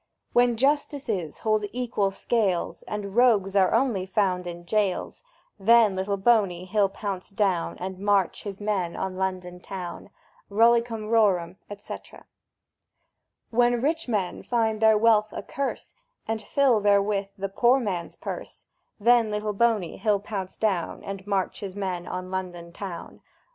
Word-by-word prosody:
When 245 -1 +4
Justices 270 - 0
hold 215 -1 +2
equal 235 -5 0
scales, 195 -3 -1
And 205 -1 -5
Rogues 215 -6 +4
are 190 -2 +4
only 210 -9 +1
found 185 -2 0
in 175 0 -7
jails; 200 -1 -1 0.4
Then 220 0 +5
Little 195 +2 -1
Boney 195 -4 +2
he'll 200 +1 +2
pounce 195 -2 -5
down, 195 -4 0
And 185 0 -6
march 200 -2 +1
his 200 -2 -7
men 200 -5 -1
on 190 -1 -3
London 185 -1 -3
town! 180 -1 -7 0.4
Rollicum 230 +1 +3
rorum, 190 -6 +2 0.2
&c. - - -7 1.5
When 240 +1 +3
Rich 315 +5 -1
Men 205 -6 -1
find 225 -2 0
their 220 -1 +6
wealth 215 -1 +4
a - - -5
curse, 275 0 -4 0.3
And 220 0 -2
fill 255 +1 +3
therewith 200 -1 +2
the 195 0 -2
Poor 240 +6 +3
Man's 185 -8 -3
purse; - - -7 0.3
Then 235 +1 +4
Little 210 0 -2
Boney 215 -4 +1
he'll 210 0 +1
pounce 195 -2 -6
down, 195 -6 -1
And 195 0 -7
march 195 -2 -1
his 195 -2 -6
men 185 -3 -3
on 185 0 -5
London 175 -2 -5
town! 190 -3 -8
200 Hz, 145 wpm, -26 LUFS, 190-225 Hz, 1.5 s, their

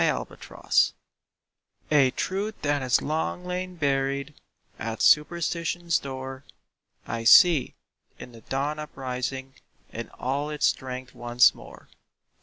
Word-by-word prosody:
EASTER - - -2
MORN - - -14 1.2
A 140 -3 +5
truth 200 +10 -3
that 145 -1 +1
has 130 -2 +2
long 160 +4 -2
lain 180 0 -4
buried 140 -1 -1 0.5
At 115 0 -4
Superstition's 170 +1 +2
door, 130 0 -7 0.6
I 115 -1 -4
see, 150 +4 +6 0.4
in 125 - -10
the 115 -1 -14
dawn 145 +5 -2
uprising 130 -2 -5 0.4
In - - -6
all 140 +4 -2
its 150 -1 -1
strength 130 0 -2
once 120 0 +4
more. - - -14
140 Hz, 115 wpm, -26 LUFS, 130-155 Hz, 1.2 s, see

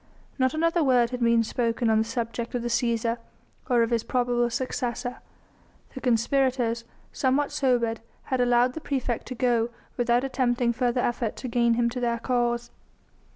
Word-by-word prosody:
Not 260 +2 +2
another 330 +1 +2
word 250 -3 +3
had 250 - -3
been 235 -1 +3
spoken 230 +1 -1
on 220 -1 +4
the - - +3
subject 230 +1 -4
of 240 - -2
the 240 - -2
Cæsar 235 -1 0 0.5
or 240 -2 +4
of 230 - -2
his 230 -1 +2
probable 240 -1 +1
successor. 245 0 -3 0.8
The 260 - -7
conspirators, 245 -1 +1 0.3
somewhat 275 +2 +1
sobered, 245 -6 +1 0.2
had 260 -1 -1
allowed 245 +1 +3
the 320 - -6
praefect 260 -5 -2
to 255 - -5
go 240 -2 +1 0.3
without 240 +1 +2
attempting 245 -3 +1
further 245 0 0
effort 240 -2 -1
to 255 - -6
gain 235 -1 +2
him 235 0 +2
to 250 - -4
their 235 -1 0
cause. 240 -1 -1
240 Hz, 165 wpm, -26 LUFS, 235-255 Hz, 0.8 s, on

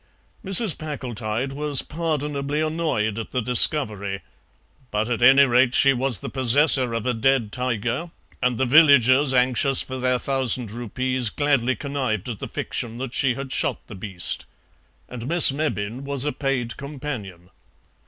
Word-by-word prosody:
Mrs. 195 0 +2
Packletide 130 -4 -4
was 145 -1 -1
pardonably 150 -3 -3
annoyed 155 -10 -1
at 115 - -6
the 125 - -2
discovery; 110 -5 +1 0.7
but, 105 +1 -1
at 120 -1 -2
any 135 +3 +7
rate, 125 0 +3
she 135 -1 +4
was 130 -2 0
the - - -8
possessor 130 -1 +2
of 115 - -3
a 125 - +1
dead 120 -1 +1
tiger, 125 +5 -3 0.3
and 125 -2 0
the 130 - +1
villagers, 140 -1 +5
anxious 130 +1 +2
for 130 0 -7
their 125 0 +1
thousand 130 -3 -2
rupees, 125 +1 -2
gladly 135 -2 0
connived 130 -8 -3
at 115 -4 -5
the - - -5
fiction 115 -1 -5
that 130 -1 -6
she 130 -3 +1
had 135 0 -7
shot - - -1
the - - -11
beast. 95 -2 -4 0.6
And 125 -1 -8
Miss 170 -2 +7
Mebbin 130 -5 -3
was 140 -1 -1
a 150 - 0
paid 135 -4 -2
companion. 130 - -7
130 Hz, 155 wpm, -23 LUFS, 115-140 Hz, 0.7 s, any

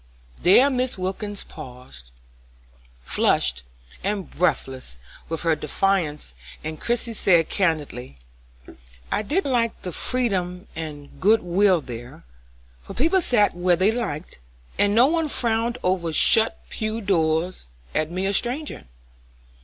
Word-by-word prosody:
There 220 +10 +6
Mrs. 255 -3 -1
Wilkins 195 +2 -3
paused, 125 - -11 0.9
flushed - - +1 0.4
and 195 -3 -2
breathless 135 - -1 0.3
with 165 +1 -2
her 165 -2 +3
defence, 150 - -1 0.3
and 155 0 -6
Christie 235 0 0
said, 175 -6 +3
candidly: 150 - -2 0.9
"I - - +1
did 310 - -1
like 240 -4 0
the 180 - -4
freedom 185 -5 -1
and 150 -3 -8
good 220 +4 +4
will 180 0 +3
there, 120 -2 -9 0.6
for - - -10
people 330 +8 +2
sat 220 -9 +3
where 175 0 +3
they 190 +5 +3
liked, 190 - -4 0.4
and 205 0 +3
no 240 +3 +7
one 320 +1 +1
frowned 235 -1 0
over 180 -3 0
shut 220 +8 +4
pew 220 +1 -3
doors, 165 - 0 0.3
at 155 0 0
me 185 +2 -2
a 195 - 0
stranger. 250 - -1
185 Hz, 125 wpm, -23 LUFS, 155-225 Hz, 0.9 s, no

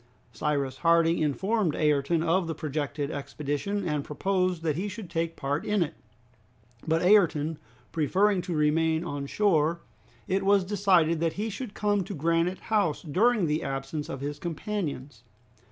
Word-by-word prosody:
Cyrus 135 +2 -1
Harding 165 +2 +3
informed 190 +4 0
Ayrton 150 +2 +2
of 170 +1 +1
the 160 - -3
projected 145 -1 -3
expedition, 145 +7 -3
and 150 -3 -1
proposed 185 +2 -1
that 155 -3 0
he 190 +6 -2
should 200 -3 -8
take 165 0 -1
part 140 +2 -2
in 210 -3 +2
it, 165 - -6 0.9
but 160 +1 +2
Ayrton 165 -6 +3 0.3
preferring 190 +5 +2
to 175 -1 -4
remain 160 +2 +2
on 145 -5 -4
shore, 170 -3 +2 0.5
it 190 +1 +1
was 200 0 +4
decided 180 -5 +2
that 165 -1 0
he 215 +2 -3
should 210 +1 -6
come 205 -2 +1
to 200 - -6
Granite 165 +4 0
House 200 -8 +1
during 205 +6 +2
the 155 +1 0
absence 135 +2 -4
of 135 - -5
his 145 +1 -4
companions. 160 - -4
165 Hz, 155 wpm, -27 LUFS, 150-190 Hz, 0.9 s, was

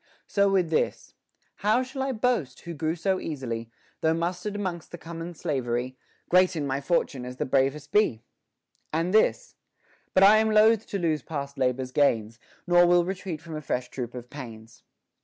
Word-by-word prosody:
So 200 -1 +2
with 185 -4 +1
this: 155 - -1 0.4
How 215 +5 +2
shall 265 +1 -6
I 270 0 0
boast, 225 - -1
who 170 - -7
grew 160 +1 -1
so 190 +2 0
easily, 115 -7 -4 0.3
Though 160 0 +2
mustered 180 +5 -3
'mongst 175 -5 -4
the 175 - -8
common 165 +1 -7
soldiery; 125 -3 -2 0.3
Great 185 0 +4
in 150 -3 -2
my 135 0 -1
fortune 140 -4 0
as 125 +1 -7
the - - -1
bravest 135 +2 0
be 165 - +2 0.7
1 - - -40
And 175 +3 -1
this 485 - +2 0.6
But 190 - +6
I 205 +2 +8
am 220 0 +3
loath 220 0 +4
to 200 - -3
lose 160 -5 0
past 140 -1 -5
labor's 130 0 0
gains; 115 -6 +1 0.3
Nor 175 -1 +5
will 175 0 +4
retreat 185 -4 -4
from 165 -2 -7
a 155 - -4
fresh 125 -3 -2
troop 125 -2 -6
of 125 0 -9
pains. 115 -4 -10
165 Hz, 180 wpm, -26 LUFS, 130-190 Hz, 0.7 s, I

